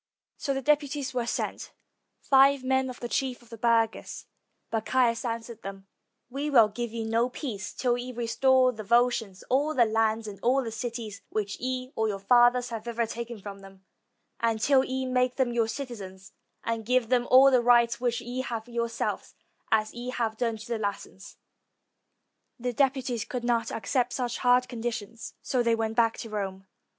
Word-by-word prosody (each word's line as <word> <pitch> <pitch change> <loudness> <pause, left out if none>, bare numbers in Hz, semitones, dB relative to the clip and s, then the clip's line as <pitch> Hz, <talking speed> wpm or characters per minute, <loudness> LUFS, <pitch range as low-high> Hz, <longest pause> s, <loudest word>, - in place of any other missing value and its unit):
So 275 -2 -2
deputies 285 -1 0
were 245 -2 -1
sent, - - -3 0.5
five 275 0 +4
men 265 0 +1
of 250 - -8
the 240 - -4
chief 255 0 -2
of 235 - -21
the 230 - -8
burghers; 230 -1 0 0.5
but 225 -1 -1
Caius 240 -3 +2
answered 230 -1 -5
them, 195 0 -8 0.4
"We 275 +4 -3
will 230 -7 +6
give 235 +2 -4
you 225 -1 -4
no 230 +2 +1
peace 225 -8 -5
till 245 -2 0
ye 250 +1 -5
restore 255 +2 +3
to 235 - -16
the 215 - -5
Volscians 235 -3 +1
all 290 +4 +1
the 240 - +5
land 220 0 +1
and 200 -3 -8
all 260 +3 +2
the 225 - -5
cities 230 -3 -5
which 205 -2 -3
ye 255 +1 -3
or 220 0 +1
your 205 -2 -2
fathers 245 +4 +4
have 225 -1 -6
ever 235 0 0
taken 235 0 -6
from 200 -1 -8
them; 195 -1 -15 0.5
and 230 -1 +1
till 265 +3 +4
ye 260 0 -3
make 255 -1 +1
them 255 -3 0
your 230 -2 +2
citizens, 210 -7 -7 0.3
and 230 -1 -2
give 250 0 +1
them 245 -1 +2
all 265 +2 +8
the 255 -2 +4
rights 235 0 +4
which 240 -1 0
ye 245 +2 -4
have 230 -3 -5
yourselves, 235 -1 -3 0.4
as 215 -1 +2
ye 240 +1 -6
have 230 -3 -2
done 230 -1 -1
to 215 - -10
the 235 -2 -2
Latins." 200 -2 -5 1.2
The 245 +1 -2
deputies 260 -3 0
could 245 +1 -5
not 235 -1 0
accept 245 +3 -1
such 245 -2 -2
hard 250 0 +4
conditions, 235 -2 -5
so 255 - 0
they 235 -1 +2
went 225 -1 -2
back 230 -1 +3
to 225 - -7
Rome. 195 -2 -4
235 Hz, 185 wpm, -27 LUFS, 225-255 Hz, 1.2 s, all